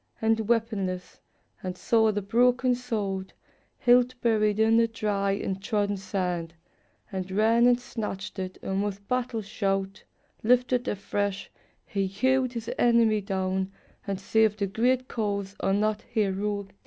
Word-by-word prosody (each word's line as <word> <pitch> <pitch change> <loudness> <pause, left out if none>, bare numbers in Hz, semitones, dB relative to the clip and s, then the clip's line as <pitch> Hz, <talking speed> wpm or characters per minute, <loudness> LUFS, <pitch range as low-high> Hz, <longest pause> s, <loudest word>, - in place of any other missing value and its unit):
And 220 -1 +1
weaponless, 205 -6 -1 0.4
and 185 -1 -5
saw 220 +1 +3
the 205 -1 -2
broken 250 +5 +3
sword. 205 -6 -3 0.4
Hilt 250 0 +4
buried 215 -3 +2
in 225 +1 +5
the 230 0 +4
dry 205 -3 -1
and 195 -1 -3
trodden 205 0 0
sand, 180 -4 -3 0.6
And 190 -1 -4
ran 225 +5 +4
and 245 0 +4
snatched 210 -5 -5
it, 185 0 -5
and 195 +1 -1
with 200 -1 -5
battle 245 -3 -1
shout 195 -1 -2 0.4
Lifted 250 +1 +2
afresh, 200 0 -2 0.3
he 195 -1 -1
hewed 260 +6 +1
his 230 -2 -5
enemy 230 -3 +4
down, 190 0 -2 0.4
And 195 -1 -2
saved 215 +1 +2
a - - +3
great 245 +6 +1
cause 200 -3 -2
on 195 +2 +1
that 215 0 0
heroic 205 -2 -1
day. - - -25
210 Hz, 140 wpm, -27 LUFS, 195-230 Hz, 0.6 s, in